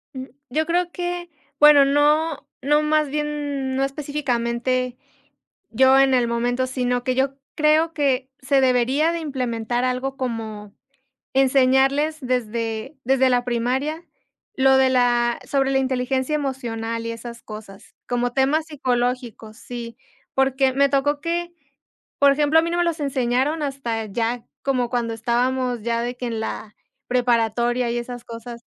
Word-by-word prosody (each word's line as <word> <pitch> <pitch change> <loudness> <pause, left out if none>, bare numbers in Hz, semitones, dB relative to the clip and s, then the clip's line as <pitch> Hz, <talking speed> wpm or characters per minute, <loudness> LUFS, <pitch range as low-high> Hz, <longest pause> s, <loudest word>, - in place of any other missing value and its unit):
Mm, 260 0 -5 0.2
yo 310 +5 0
creo 350 +1 0
que 350 0 -4 0.3
bueno, 295 -2 +8
no 295 +2 +2
no 295 +2 +3
más 305 -1 +1
bien 290 -2 -2
no 270 - +1
específicamente 255 -3 -1 0.7
yo 265 +3 +5
en 270 -1 +4
el 245 -2 +3
momento, 245 +2 0
sino 250 -1 -1
que 255 0 0
yo 270 +1 0 0.2
creo 310 +1 +3
que 270 -3 0
se 270 +1 +2
debería 260 +5 +2
de 340 - -2
implementar 245 -5 -2
algo 255 +2 -2
como 220 -5 -5 0.6
enseñarles 270 +3 +3
desde 235 0 -3
desde 265 +1 +3
la 245 -1 +2
primaria 260 +7 -1 0.5
lo 265 0 +5
de 265 0 +4
la 240 -2 +2
sobre 270 -1 0
la 270 - +3
inteligencia 260 +2 -1
emocional 230 -5 -3
y 230 - -2
esas 235 0 -8
cosas, 215 -2 -11
como 245 0 -1
temas 275 +5 +1
psicológicos, 245 -6 -2
sí, 235 -1 -8 0.4
porque 265 0 +2
me 280 +1 +3
tocó 285 +1 +1
que, 345 +1 -2 0.7
por 280 0 +7
ejemplo, 300 +3 +3
a - - -3
mí 335 - -2
no 345 - -1
me 350 - +3
los 335 -2 -1
enseñaron 270 +2 0
hasta 240 -6 -3
ya 230 +3 -2 0.2
como 255 -3 0
cuando 235 -2 -1
estábamos 245 +1 0
ya 230 +1 -1
de 245 +1 -4
que 250 - -5
en 230 -2 -3
la 215 -1 -6 0.3
preparatoria 240 0 +1
y 240 - -1
esas 245 0 -7
cosas, 235 0 -9
260 Hz, 150 wpm, -22 LUFS, 240-280 Hz, 0.7 s, bueno